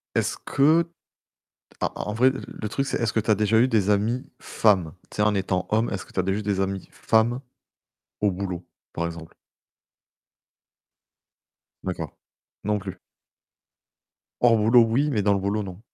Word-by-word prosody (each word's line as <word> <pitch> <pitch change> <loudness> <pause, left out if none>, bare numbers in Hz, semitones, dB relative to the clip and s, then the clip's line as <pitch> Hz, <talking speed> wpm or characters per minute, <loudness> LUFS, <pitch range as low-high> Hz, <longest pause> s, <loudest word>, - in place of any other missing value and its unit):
Est-ce - - 0
que, 155 +5 +4 1.0
en - - +2
en 105 - -4
vrai 125 +4 +5
le 120 -4 -6
truc 135 +5 -1
c'est - - -1
est-ce 115 -2 0
que 110 - +2
tu 110 - -2
as - - +7
déjà 105 +2 +2
eu 125 +3 +5
des 105 -5 +2
amis 110 +5 +1 0.2
femmes? 95 -8 +2 0.2
Tu - - -11
sais 105 - +2
en 105 0 +3
étant 90 -2 -1
homme 110 +2 +2
est-ce 100 - -4
que - - -19
tu - - 0
as - - +1
déjà 95 +2 0
eu - - -5
des 100 -2 -1
amis 95 -1 -2
femmes 115 +3 +1 0.8
au 105 -1 +3
boulot 90 -1 -4 0.3
par 85 - -2
exemple? 85 -1 -7 2.5
D'accord. 85 -5 -4 0.5
Non 105 0 0
plus. 95 -2 -7 1.4
Hors 120 -1 +5
boulot 115 +3 +6
oui, 125 +7 +1
mais 105 - +1
dans 100 0 +4
le - - 0
boulot 100 +2 -1
non. 95 -1 -8
105 Hz, 175 wpm, -25 LUFS, 95-115 Hz, 2.5 s, as